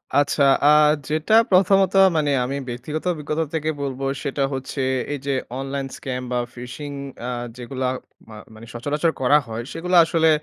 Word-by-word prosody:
আচ্ছা, 145 0 +3 0.2
আ - - +7 0.4
যেটা 155 +6 0 0.2
প্রথমত 190 +1 +4 0.2
মানে 150 -2 +1
আমি 140 +3 -3
ব্যক্তিগত 130 +6 -5
অভিজ্ঞতা 155 0 -2
থেকে 155 -1 -1
বলব 135 -1 -4 0.2
সেটা 140 0 -1
হচ্ছে 135 +1 -4 0.3
এই 145 - -4
যে 140 - 0 0.3
অনলাইন 135 0 -3
স্ক্যাম 125 -1 -4
বা 125 - +1 0.2
phishing 125 +4 -7 0.3
আ - - -2 0.3
যেগুলা 130 +1 -3 0.4
মা 110 - -10 0.2
মানে 110 +1 -12
সচরাচর 145 +7 0
করা 130 +3 +5
হয় 115 +1 -5
সেগুলা 180 +2 +1
আসলে 160 -1 +2
140 Hz, 155 wpm, -22 LUFS, 130-155 Hz, 0.4 s, আ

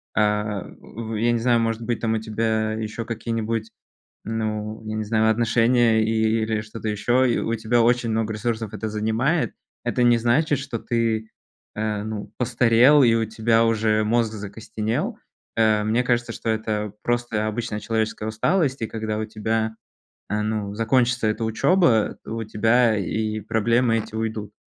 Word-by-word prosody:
Э, 105 -1 +1 0.2
в 115 0 -8
э, 105 - -2
я 120 +1 +3
не 120 - +1
знаю, 120 0 +3
может 115 0 -1
быть, 120 0 -2
там 110 -1 0
у - - 0
тебя 110 0 -1
еще 110 +1 -4
какие-нибудь, 115 -1 -3 0.5
ну, 110 -1 -3
я 110 0 -4
не 110 - -2
знаю, 110 +1 +2
отношения, 115 0 +3
или 110 0 +1
что-то 110 +1 -7
еще, 120 +4 +2
и - - +1
у 115 - -1
тебя 115 +2 +1
очень 120 0 +2
много 110 0 -1
ресурсов 110 0 -3
это 110 - -4
занимает. 110 +9 0 0.3
Это 120 +1 -1
не 120 -1 +5
значит, 130 +5 +2
что 135 -4 -5
ты, 115 -2 -1 0.4
э, 105 -1 -2
ну, 110 -1 -6
постарел, 125 +3 +5
и 115 -2 +5
у 115 -1 +1
тебя 115 +1 +2
уже 110 -1 +2
мозг 115 0 +1
закостенел. 110 +2 -4 0.4
Э, 110 -1 +3
мне 110 +4 +1
кажется, 120 -1 0
что 115 - -4
это 110 -2 -2
просто 120 -3 -1
обычная 110 0 -3
человеческая 110 -1 -2
усталость. 135 - 0
И 115 - -1
когда 110 -1 -3
у 110 - -2
тебя, 110 +1 -2 0.5
э, 105 +2 0
ну, 105 -1 -2
закончится 120 +2 +2
эта 110 +1 -1
учеба, 115 - +2
у 115 0 -4
тебя 115 +2 +3
и 110 +2 -2
проблемы 115 +3 +2
эти 110 - -5
уйдут. 110 -2 -3
110 Hz, 165 wpm, -23 LUFS, 110-115 Hz, 0.5 s, не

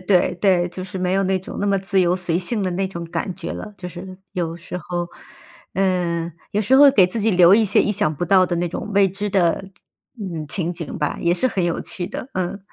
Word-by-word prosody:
对 185 -2 +2
对， 180 -1 +2
就 185 +1 -7
是 190 0 -6
没 180 0 0
有 195 - +2
那 190 0 +1
种 185 - -9
那 205 - 0
么 200 -1 +2
自 195 0 +1
由 180 0 +2
随 175 -2 0
性 205 +5 -1
的 190 - 0
那 190 +2 -1
种 170 -2 -6
感 170 +3 -3
觉 185 - -5
了， 210 - -7
就 180 -1 -6
是 185 +2 -9
有 170 -3 -3
时 175 +1 -7
候。 175 0 -4 0.7
嗯， 175 -3 0 0.2
有 210 - 0
时 235 +5 +2
候 285 +1 +8
给 195 -8 +5
自 200 +5 -3
己 220 +2 +3
留 180 -1 +6
一 225 - +5
些 205 - +4
意 210 - +1
想 205 -6 0
不 175 - -2
到 185 +1 +5
的 175 - -2
那 175 +1 0
种 185 - -6
未 200 0 +5
知 200 +3 -3
的， 185 -1 +1 0.5
嗯， 175 -7 -5
情 175 +1 -1
景 165 -4 -6
吧， 150 - -2
也 170 - +2
是 175 +8 +1
很 195 -7 -1
有 170 -1 -1
趣 175 - -4
的， - - -6
嗯。 185 +1 -2
185 Hz, 265 characters per minute, -21 LUFS, 175-195 Hz, 0.7 s, 候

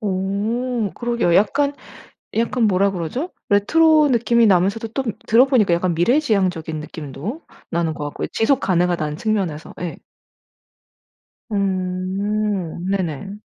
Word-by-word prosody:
오 210 +4 -1
그러게요. 235 -8 0
약간, 280 +9 +3 0.7
약간 235 +1 +1
뭐라 200 0 +2
그러죠? 195 - -4 0.2
레트로 305 +9 +4
느낌이 235 0 +3
나면서도 200 +4 +2
또 265 +5 -2 0.2
들어보니까 235 -5 +4
약간 175 0 +1
미래지향적인 185 - +1
느낌도 155 - -7 0.3
나는 165 -2 -1
것 150 - -6
같고요. 145 - -4
지속 245 +5 +2
가능하다는 175 -5 0
측면에서. 190 -8 -2
예. 175 -3 -4 1.5
음. 190 -1 -2
네네. 195 +1 -3
200 Hz, 275 characters per minute, -20 LUFS, 175-235 Hz, 1.5 s, 레트로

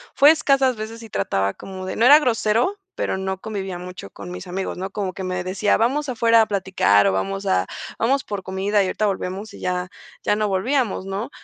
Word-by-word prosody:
Fue 290 +2 +8
escasas 275 -5 +2
veces 225 +2 -7
y 225 - -11
trataba 100 0 0
como 190 -1 -8
de 185 - -4
no 230 - +3
era 285 +4 +10
grosero, 245 - +1 0.2
pero - - -1
no 190 0 -3
convivía 195 -3 -5
mucho 180 +1 -8
con 180 - -9
mis 180 +1 -7
amigos, 185 +1 -4
¿no?, 190 +2 -4
como 195 -2 -3
que 190 - -5
me 180 -1 -2
decía: 190 +3 +1
"Vamos 275 +6 +1
afuera 230 -2 +4
a - - +3
platicar", 185 - +3
o: - - +3
"Vamos 95 +1 -2
a 90 0 +1 0.3
vamos 265 +4 +2
por 205 -2 -5
comida 195 +2 0
y - - +1
ahorita 215 - -1
volvemos", 200 +1 -3
y - - -11
ya 180 0 -2 0.3
ya - - +2
no 215 0 +1
volvíamos, 215 +2 0
¿no? 195 +4 -4
195 Hz, 215 wpm, -22 LUFS, 185-230 Hz, 0.3 s, era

